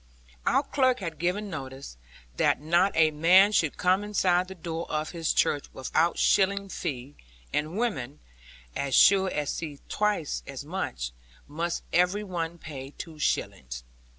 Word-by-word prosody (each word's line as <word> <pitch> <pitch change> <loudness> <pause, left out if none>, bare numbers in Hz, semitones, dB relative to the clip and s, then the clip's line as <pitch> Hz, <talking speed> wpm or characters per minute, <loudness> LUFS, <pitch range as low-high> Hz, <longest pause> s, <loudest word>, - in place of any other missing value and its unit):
Our - - +3
clerk 260 -3 +2
had 165 -5 -5
given 180 +5 -1
notice, 135 - -7 0.4
that - - +3
not 170 +6 +3
a 160 -1 +5
man 180 +7 +6
should 160 -8 +1
come 185 +3 +2
inside 185 -3 +2
the 190 - -9
door 165 -1 -5
of 155 0 -2
his 165 -2 -1
church 145 - +1
without 160 +6 0
shilling 200 0 +2
fee; 140 -7 -5 0.4
and 155 +5 -1
women 145 - -2 0.6
(as 140 -2 -1
sure 190 -1 +6
to 150 -4 -2
see 150 0 -4
twice 210 -8 0
as 140 0 -7
much) 65 - -3 0.4
must 165 +3 -3
every 180 +4 +3
one 170 -3 -4
pay 135 -5 -8
two 160 -2 -8
shillings. 60 - -2
165 Hz, 150 wpm, -27 LUFS, 145-190 Hz, 0.6 s, man